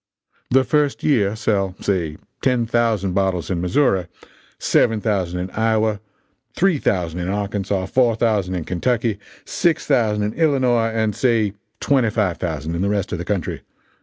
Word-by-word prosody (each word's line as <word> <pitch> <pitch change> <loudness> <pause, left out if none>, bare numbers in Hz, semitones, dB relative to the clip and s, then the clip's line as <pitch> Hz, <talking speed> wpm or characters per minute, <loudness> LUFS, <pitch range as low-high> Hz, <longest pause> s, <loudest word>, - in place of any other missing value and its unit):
"The 130 +1 +4
first 145 +2 0
year 110 -9 +2
sell, 100 -4 0
say, 85 -6 -1 0.2
ten 125 -3 +2
thousand 110 -5 0
bottles 95 -3 0
in 85 -2 -1
Missouri, 90 - +1 0.5
seven 115 -2 +2
thousand 95 -5 -1
in 95 +1 -5
Iowa, 110 -1 +1 0.6
three 180 -5 +2
thousand 90 -6 -1
in 90 +1 -3
Arkansas, 100 -1 -2
four 120 +3 +2
thousand 105 -5 0
in 85 - -3
Kentucky, 110 +4 -1 0.3
six 170 -3 0
thousand 110 -7 +2
in 105 +1 -2
Illinois, 130 -7 +2
and 110 -2 -1
say 115 -4 +1 0.3
twenty 130 -5 +2
five 100 -5 0
thousand 80 -2 -3
in 85 - -2
the 100 - +1
rest 100 -2 -1
of 90 - -3
the 90 - -5
country. 95 -4 -2
105 Hz, 160 wpm, -21 LUFS, 95-120 Hz, 0.6 s, The